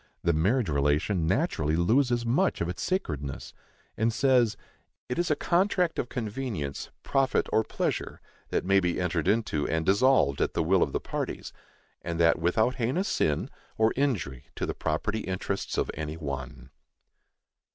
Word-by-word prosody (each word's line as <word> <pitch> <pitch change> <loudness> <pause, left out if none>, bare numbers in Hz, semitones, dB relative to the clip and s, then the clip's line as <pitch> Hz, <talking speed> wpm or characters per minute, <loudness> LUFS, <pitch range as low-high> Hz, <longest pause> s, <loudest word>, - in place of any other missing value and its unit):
the 85 - +3
marriage 100 +9 +2
relation 75 +4 +1
naturally 80 - +1
loses 120 - +2
much 140 +12 +1
of 85 - -1
its 90 - -5
sacredness, 75 - -3 0.4
and 115 +1 +1
says: 125 -2 +3 0.5
It 125 - -3
is 175 0 +1
a 150 - +3
contract 180 +1 +1
of 120 - -2
convenience, 110 - -4
profit 135 -2 +1
or 110 - +4
pleasure, - - -3 0.3
that - - -1
may 95 +1 +4
be 90 -2 -1
entered 90 -2 -1
into 100 -8 +1
and 80 0 -1
dissolved 100 - +3
at - - 0
the 85 - +2
will 90 +3 +3
of 70 - +2
the - - -1
parties, - - -5 0.5
and 85 -1 -4
that 85 0 +4
without 110 +10 +1
heinous 135 - 0
sin, 75 -2 0 0.3
or 110 0 +3
injury 95 - -1
to - - -2
the - - -3
property 100 +8 -2
interests 95 0 -3
of - - 0
any 80 +1 -5
one. 70 -3 -6
95 Hz, 160 wpm, -28 LUFS, 80-125 Hz, 0.5 s, or